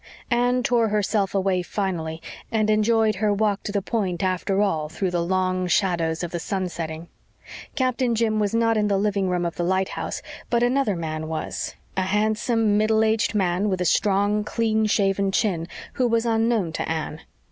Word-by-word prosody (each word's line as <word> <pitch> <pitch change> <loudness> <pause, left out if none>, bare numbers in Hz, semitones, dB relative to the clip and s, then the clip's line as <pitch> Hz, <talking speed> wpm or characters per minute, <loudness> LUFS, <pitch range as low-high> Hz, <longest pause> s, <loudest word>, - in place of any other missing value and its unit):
Anne 245 +1 +2
tore 235 -2 +2
herself 205 -1 0
away 190 -1 +1
finally 175 -4 -3 0.3
and 215 -1 +2
enjoyed 215 0 +2
her 210 +1 +1
walk 205 -1 +1
to - - -5
the 200 -1 -1
Point 190 -6 -2
after 190 +1 0
all, 160 -7 0
through 180 +3 -2
the 175 -1 0
long 185 0 0
shadows 175 -3 +1
of 175 - -4
the 175 - -3
sun 190 +1 -2
setting. 165 -1 -6 0.7
Captain 255 -3 +1
Jim 220 -1 +1
was 210 +1 0
not 230 -1 +2
in 210 -1 +2
the 200 -1 +2
living 200 -1 0
room 180 -1 0
of 170 - -4
the 175 - -1
lighthouse, 190 +2 -1 0.3
but 235 0 +2
another 245 -4 +2
man 155 -2 -4
was 160 -1 -4 0.2
a 190 - +1
handsome, 215 +2 +1
middle 220 +1 +3
aged 220 +1 +1
man, 190 +1 +1
with 185 -2 -1
a 180 - 0
strong, 205 +4 +2
clean 220 0 0
shaven 195 -1 +1
chin, 180 -5 0 0.3
who 255 - +1
was 230 0 +1
unknown 225 -5 +1
to - - -3
Anne. 160 -1 -3
200 Hz, 180 wpm, -24 LUFS, 180-220 Hz, 0.7 s, middle